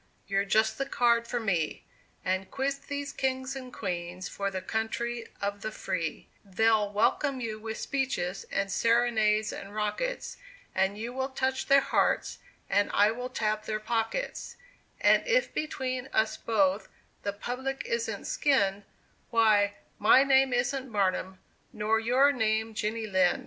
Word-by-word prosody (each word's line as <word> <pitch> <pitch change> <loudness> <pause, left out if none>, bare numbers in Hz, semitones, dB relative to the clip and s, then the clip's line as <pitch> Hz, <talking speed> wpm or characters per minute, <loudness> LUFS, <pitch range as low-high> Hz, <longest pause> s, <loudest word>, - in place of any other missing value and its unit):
you're 195 0 +1
just 220 +2 +2
the 275 - 0
card 235 -3 +2
for 240 - -1
me, 175 -8 -1 0.4
And 190 +1 -1
quit 275 +1 -1
these 285 0 -4
kings 260 0 -1
and 255 -2 -7
queens, 180 -2 -4
for 200 0 -3
the 190 -1 -3
country 230 +3 -3
of 200 0 -3
the 215 - -3
free; 170 -6 -3 0.2
They'll 210 +1 +2
welcome 260 +6 +1
you 220 -3 -4
with 220 0 -5
speeches, 255 -10 -2
and 195 0 -1
serenades, 220 -1 +2
and 200 +1 -8
rockets, 215 - -2 0.4
And 190 +2 +1
you 230 +3 -5
will 265 +1 -2
touch 265 0 -1
their 275 0 +6
hearts, - - +1 0.3
and 205 +1 +2
I 205 +1 +5
will 245 +2 -5
tap 215 -3 -1
their 215 0 -1
pockets; 225 - -2 0.4
And - - +5
if - - +2
between 260 -4 -3
us 220 0 +2
both 195 -3 +1 0.3
the 200 - -2
public 255 +6 -4
isn't 470 -1 -2
skinned, 200 -8 +1 0.4
Why, 215 -3 +4 0.2
my 225 +5 +6
name 270 -1 +4
isn't 255 +1 -1
Barnum, 190 -2 0 0.3
nor 215 +1 +1
your 255 +5 +4
name 220 -3 0
Jenny 220 +1 -2
Lind!" 190 -3 +2
220 Hz, 150 wpm, -29 LUFS, 205-260 Hz, 0.4 s, their